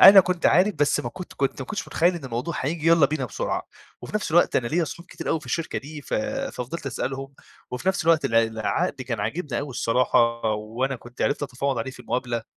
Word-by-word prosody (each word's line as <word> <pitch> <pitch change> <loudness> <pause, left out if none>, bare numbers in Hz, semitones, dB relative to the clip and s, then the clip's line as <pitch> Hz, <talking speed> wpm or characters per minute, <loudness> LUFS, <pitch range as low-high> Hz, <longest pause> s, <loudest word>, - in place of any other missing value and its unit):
أنا 195 0 +11
كنت 180 -1 +1
عارف 190 +3 +4
بس 145 0 +2
ما - - -3
كنت 180 - -9
كنت 135 -1 -1
ما - - -8
كنتش 215 - -4
متخيّل 175 +2 +3
إن 160 -6 -7
الموضوع 130 +7 -3
هييجي 155 +4 -2
يالّا 165 -4 +6
بينا 145 -3 -2
بسرعة، 115 - -2 0.4
وفي - - -9
نفْس 210 - -1
الوقت 175 +2 +4
أنا 120 - +1
ليَّ 170 +1 +2
صحاب 170 +4 -8
كتير - - -7
أوي 160 - +1
في - - -13
الشركة 165 - -2
دي 150 +1 -9
ف - - -3
ففضِلت 270 - -3
أسألهم، 135 +1 -3 0.4
وفي 125 +9 -2
نفْس 190 -4 +1
الوقت 165 -1 +4
الع 115 0 +4
العقد 110 -1 -1
كان - - -3
عاجبني 150 -7 -2
أوي 145 -1 -5
الصراحة 115 -1 +2
وأنا 120 +5 -2
كنت 120 +1 -7
عِرفت 145 +1 +1
أتفاوض 135 -1 -1
عليه 130 +4 -3
في 130 - -12
المقابلة، 120 -2 -2
140 Hz, 220 wpm, -25 LUFS, 125-170 Hz, 0.4 s, أنا